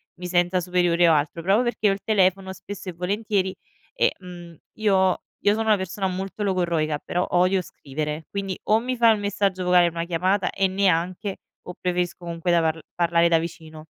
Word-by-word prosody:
mi 180 - -9
senta 175 +1 +2
superiore 175 -1 +2
o - - +5
altro, 155 +2 0
proprio 200 +6 +3
perché 240 -3 +1
ho 195 - +3
il 195 - -6
telefono 190 -2 +2
spesso 195 +1 -8
e 180 - -6
volentieri 190 +1 -1 0.4
e, - - +3
mhmm, 175 -2 -11 0.2
io 190 -3 +2 0.2
io 205 - +5
sono 225 - -2
una 215 - +5
persona 190 +1 -3
molto 190 +3 -5
logorroica 170 -6 0
però 180 +1 -1
odio 185 +1 +3
scrivere, 150 0 -5
quindi 195 -2 -4
o 215 +1 +5
mi 255 +2 -3
fai 230 -1 +6
un 210 - -6
messaggio 200 -2 -1
vocale, 180 -1 +5
una 170 0 -4
chiamata 185 +3 0
e 195 - +1
neanche, 185 0 0 0.3
o 180 - -6
preferisco 180 -1 -1
comunque 170 +1 -4
da 170 - +4
parl 160 0 0 0.2
parlare 170 -1 +3
da 165 - +4
vicino. 160 -2 -8
180 Hz, 190 wpm, -24 LUFS, 170-195 Hz, 0.4 s, fai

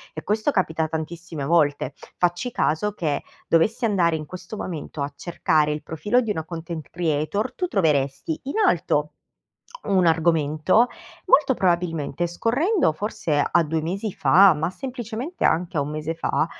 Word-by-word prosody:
e 155 - -6
questo 215 +7 0
capita 160 - 0
tantissime 160 -1 -5
volte. 145 -3 +2 0.2
Facci 175 +7 0
caso 200 +2 0
che, 155 -7 -1 0.3
dovessi 220 +9 +2
andare 175 -6 +2
in 155 -1 -5
questo 185 +6 -8
momento 155 -3 -5
a 140 +1 -5
cercare 150 -1 +1
il 150 - -4
profilo 205 +10 0
di 220 -3 -2
una 160 -5 -2
content 165 -1 -7
creator, 165 +4 -1
tu 360 - -2
troveresti, 150 - 0
in 280 - -4
alto - - +1 0.7
un 190 -3 +2
argomento; 165 +6 +3 0.4
molto 275 -7 +5
probabilmente 175 -4 0
scorrendo, 250 - +1
forse, 170 -5 -1
a - - +4
2 160 +1 -1
mesi 195 +5 -3
fa, 180 +8 +6
ma 155 +2 -1
semplicemente 250 - -5
anche 170 0 0
a - - +3
1 140 - -3
mese 155 +1 -3
fa, 165 -1 0
170 Hz, 150 wpm, -23 LUFS, 155-210 Hz, 0.7 s, fa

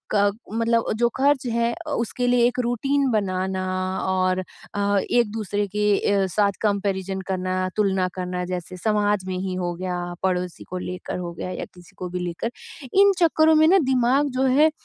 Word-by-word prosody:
क 205 0 +4 0.2
मतलब 230 0 +1
जो 235 +1 +3
खर्च 275 0 +2
है 235 0 +1
अ, 340 -2 -8
उसके 245 -1 -1
लिए 245 -1 +4
एक 250 +1 -2
रूटीन 270 +4 +1
बनाना 190 -3 -1 0.4
और 185 0 +1
अ, 200 +2 -2
एक-दूसरे 210 -3 0
के 210 - +1 0.3
अ, 195 -1 +2
साथ 205 -1 +3
कंपैरिजन 195 -2 -1
करना 185 -1 -2 0.2
तुलना 190 -3 +1
करना 180 -1 -3
जैसे 180 0 -5
समाज 205 0 +1
में 185 -1 -2
ही 185 0 -3
हो 175 -1 -2
गया, 175 -1 -4
पड़ोसी 180 -2 -1
को 185 - -4
लेकर 180 0 -5
हो 175 -1 -4
गया 175 - -5
या 180 - -4
किसी 175 -1 -17
को 180 - -5
भी 180 +1 -4
लेकर। 180 +6 -3 0.4
इन 400 +1 +6
चक्करों 320 -2 +4
में 310 0 +6
ना 375 +4 +6
दिमाग 260 +3 +3
जो - - +3
है 305 +2 +7
अ, - - -1
200 Hz, 180 wpm, -23 LUFS, 185-240 Hz, 0.4 s, है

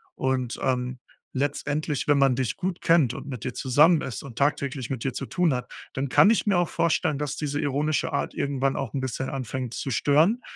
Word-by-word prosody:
Und, 130 -2 -1
ähm, 125 -1 -1 0.4
letztendlich, 145 +1 -1
wenn 145 -1 +4
man 135 -2 +4
dich 130 -1 -2
gut 185 0 -3
kennt 155 -8 +3
und - - -7
mit 125 -6 -6
dir 130 - -3
zusammen 150 +5 +4
ist 130 - -5
und 125 -4 -10
tagtäglich 140 -3 0
mit 130 -4 -3
dir 135 - -1
zu 135 - -4
tun 175 +2 +1
hat, 125 -1 -4 0.2
dann 135 +1 -2
kann 200 - +6
ich 225 - +2
mir 200 -4 +3
auch 175 - 0
vorstellen, 160 -2 +1
dass 150 -1 -3
diese 145 -1 -2
ironische 145 +2 0
Art - - -2
irgendwann 135 -1 0
auch 135 -5 -4
'n 135 - -2
bisschen 130 0 -3
anfängt 130 -2 -4
zu 135 - -4
stören. 155 - +3
140 Hz, 210 wpm, -25 LUFS, 130-150 Hz, 0.4 s, kann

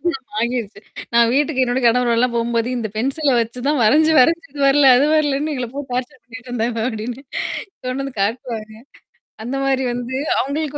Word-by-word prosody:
திருமணம் 270 -7 -3
வாங்கிருச்சு. 230 -3 -2 0.3
நான் 235 0 +5
வீட்டுக்கு 285 -2 +1
என்னோட 245 +1 -1
கணவரோடல்லாம் 240 0 +2
போம்போது 230 0 0
இந்த 220 -2 -3
பென்சில 275 +5 0
வச்சு 230 +2 -4
தான் 290 -4 +1
வரைஞ்சு 310 +8 +4
வரைஞ்சு 330 +5 +2
இது 285 - -8
வரல. 275 -1 +6
அது 280 - +3
வரலன்னு 300 0 +1
எங்கள 250 -2 -3
போ 285 - -4
டார்ச்சர் 250 0 -4
பண்ணிட்டு 240 +2 -12
இருந்தாங்க 235 -1 -2
அப்டின்னு. 230 +4 -5 0.6
கொண்டு 255 +2 -3
வந்து 275 -1 -6
காட்டுவாங்க. 220 0 -4 0.7
அந்த 245 +4 -4
மாரி 270 -1 +1
வந்து, 245 +1 -4 0.2
அவங்களுக்கு 295 +1 -2
250 Hz, 165 wpm, -19 LUFS, 235-275 Hz, 0.7 s, வரல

